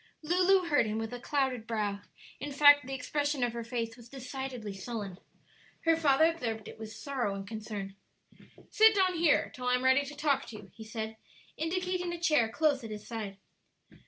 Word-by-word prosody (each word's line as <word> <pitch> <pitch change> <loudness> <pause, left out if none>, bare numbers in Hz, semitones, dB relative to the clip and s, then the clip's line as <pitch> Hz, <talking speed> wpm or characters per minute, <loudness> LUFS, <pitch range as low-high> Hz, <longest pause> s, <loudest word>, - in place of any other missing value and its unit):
Lulu 360 +3 +3
heard 290 -7 +3
him 215 +1 -2
with 225 +1 -4
a 245 - -5
clouded 260 -4 -1
brow; 210 -3 -1 0.4
in 290 - -5
fact, 290 -1 +6
the 270 - -4
expression 290 +1 -1
of 240 -1 0
her 235 0 -4
face 230 -1 -3
was 240 -1 -15
decidedly 255 -4 -6
sullen. 195 -2 -6 0.6
Her 330 0 +4
father 310 -1 +4
observed 235 -10 -2
it - - -11
with 220 -1 -7
sorrow 240 -3 -3
and 195 0 -7
concern. 210 -2 -6 0.8
"Sit 440 0 +6
down 375 -2 +3
here 335 -3 +2
till 250 0 -5
I 250 - +4
am 250 - -2
ready 260 +2 +5
to 295 +1 -8
talk 290 -2 +1
to 230 - -9
you," - - -11
he 225 - -10
said, 220 0 -5 0.4
indicating 360 +2 -2
a 345 - -5
chair 300 -9 +3
close 285 +1 +1
at 225 - -6
his 210 -1 -7
side. 215 -4 -5
250 Hz, 190 wpm, -31 LUFS, 220-300 Hz, 0.8 s, fact